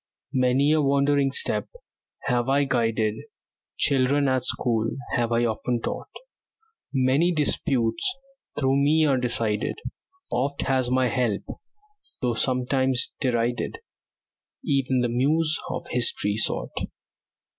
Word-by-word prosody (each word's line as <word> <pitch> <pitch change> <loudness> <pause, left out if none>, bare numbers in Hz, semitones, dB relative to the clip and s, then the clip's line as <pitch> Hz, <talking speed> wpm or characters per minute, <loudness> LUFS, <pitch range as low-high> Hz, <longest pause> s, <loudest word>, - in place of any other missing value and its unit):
Many 130 +3 +3
a 155 0 +3
wandering 140 0 +2
step - - 0 0.6
have 125 -1 0
I 140 +1 +3
guided; 115 -5 0 0.6
Children 140 +1 +3
at 130 -1 +1
school 115 -3 0 0.2
have 120 -1 0
I 120 +1 +2
often 120 +2 -1
taught; - - -5 0.8
Many 135 +6 +2
disputes 130 - 0 0.4
through 135 -1 +2
me 155 +2 +4
are 135 -3 +2
decided; 115 -3 -1 0.6
Oft 140 +3 -1
has 130 -2 +1
my 130 0 +2
help, 120 -4 0 0.8
though 125 -1 0
sometimes 130 +1 +1
derided, 120 - 0 0.9
Even 135 -3 +1
the 120 - +1
Muse 150 +6 +2
of - - -4
History 110 -4 +1
sought. 110 - -1
130 Hz, 115 wpm, -25 LUFS, 120-140 Hz, 0.9 s, me